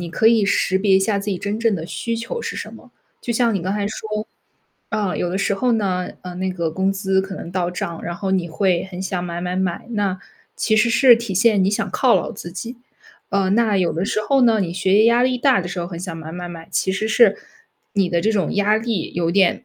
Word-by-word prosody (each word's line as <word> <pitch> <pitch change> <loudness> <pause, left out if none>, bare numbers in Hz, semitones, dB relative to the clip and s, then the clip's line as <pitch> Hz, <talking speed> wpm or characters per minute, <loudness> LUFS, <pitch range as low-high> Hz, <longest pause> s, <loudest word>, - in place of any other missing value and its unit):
你 175 - -5
可 220 - +1
以 225 -2 +5
识 190 -1 +1
别 195 -1 +4
一 - - +3
下 200 +1 +1
自 200 - -6
己 190 - -1
真 200 +4 -3
正 230 -2 +2
的 165 -4 -4
需 230 +5 -3
求 230 - -4
是 - - -5
什 - - -6
么。 - - -14 0.3
就 240 - -3
像 235 -1 +2
你 195 - 0
刚 185 +3 -2
才 205 -1 -1
说， 215 0 -4 0.6
啊， 200 -4 -1
有 175 - -1
的 180 - -2
时 200 - 0
候 245 +5 +1
呢， 190 -5 0
嗯， 180 -1 -7
那 190 0 -1
个 170 -3 -2
工 190 +4 0
资 190 -1 +1
可 190 0 -6
能 170 - -8
到 180 -1 -1
账， 170 -2 -5
然 175 - -4
后 190 +2 -3
你 185 -3 0
会 180 +1 +1
很 180 0 -6
想 185 -1 -3
买 170 -1 -4
买 180 0 -2
买， 185 -2 -2
那， 200 -4 -1 0.4
其 220 - +1
实 220 +2 +4
是 240 +2 +7
体 230 -4 -4
现 210 +1 +4
你 190 - +2
想 205 - -1
犒 255 -3 +3
劳 185 - 0
自 175 - -8
己。 230 +8 -7 0.5
嗯， 195 -1 +1
那 220 -2 +2
有 180 -3 +1
的 175 +5 -2
时 215 - 0
候 275 -1 +3
呢， 230 -2 +4
你 175 -3 -2
学 190 +2 +1
业 215 +2 +6
压 235 +1 +4
力 255 0 +2
大 250 -2 +3
的 175 - -5
时 180 +1 -5
候 170 - -3
很 170 -1 -7
想 180 -2 -5
买 160 0 -8
买 175 0 -6
买， 165 -1 -9
其 190 - 0
实 215 +3 -1
是 220 -2 +5 0.6
你 195 -4 +1
的 170 -1 0
这 220 - +2
种 200 -3 0
压 205 +1 +3
力 220 -6 -3
有 170 -1 0
点 190 +5 +2
195 Hz, 280 characters per minute, -21 LUFS, 180-220 Hz, 0.6 s, 是